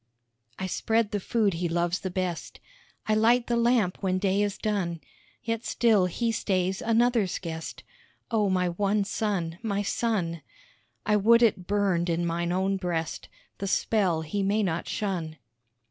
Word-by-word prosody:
I 190 - -3
spread 220 +3 0
the 205 - -1
food 210 0 +1
he 170 +1 -2
loves 175 +1 0
the 190 - -4
best, 180 -2 -4 0.5
I 215 - +3
light 235 +3 +4
the 240 - 0
lamp 235 -5 +2
when 185 -2 +1
day 195 +1 +1
is 205 -1 -1
done, 185 -6 -2 0.4
Yet 230 0 -2
still 215 -6 +3
he 230 +6 -1
stays 190 -3 -1
another's 230 -4 +2
guest 160 -2 -6 0.5
Oh, 210 -3 +2
my 180 -1 +1
one 200 +3 +1
son, 190 -5 -2
my 205 -3 -1
son. 190 -7 -1 0.6
I 210 -1 +3
would 230 +4 +5
it 190 -5 +2
burned 195 -4 +1
in 170 +1 0
mine 170 +1 -1
own 190 +2 +1
breast 170 -4 -3 0.3
The 200 - -3
spell 185 -5 +1
he 180 +6 -2
may 205 +2 +1
not 170 -3 -2
shun. 175 -7 -3
195 Hz, 160 wpm, -27 LUFS, 175-215 Hz, 0.6 s, would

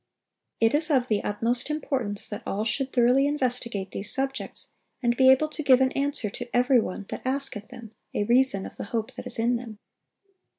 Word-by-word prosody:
It 225 0 +3
is 310 +2 +1
of 260 -4 +2
the 210 -2 +1
utmost 230 +6 +3
importance 260 -9 -2
that 210 - -6
all 210 +2 -2
should 265 +3 -1
thoroughly 250 +3 +3
investigate 245 -8 -2
these 205 +2 -2
subjects, 270 0 -4 0.3
and 240 0 +2
be 260 +1 +5
able 265 +4 +5
to 310 - -5
give 265 -3 +5
an 260 0 +2
answer 275 -7 -1
to 245 +2 -7
every 250 +1 +4
one 200 -2 -4
that - - -5
asketh 260 -5 -2
them 225 -3 -11 0.2
a - - +1
reason 235 -3 +3
of - - -10
the - - -5
hope 225 +4 -3
that - - -8
is 245 - -4
in 235 +2 +1
them. 230 -3 -9
245 Hz, 200 wpm, -26 LUFS, 220-270 Hz, 0.3 s, be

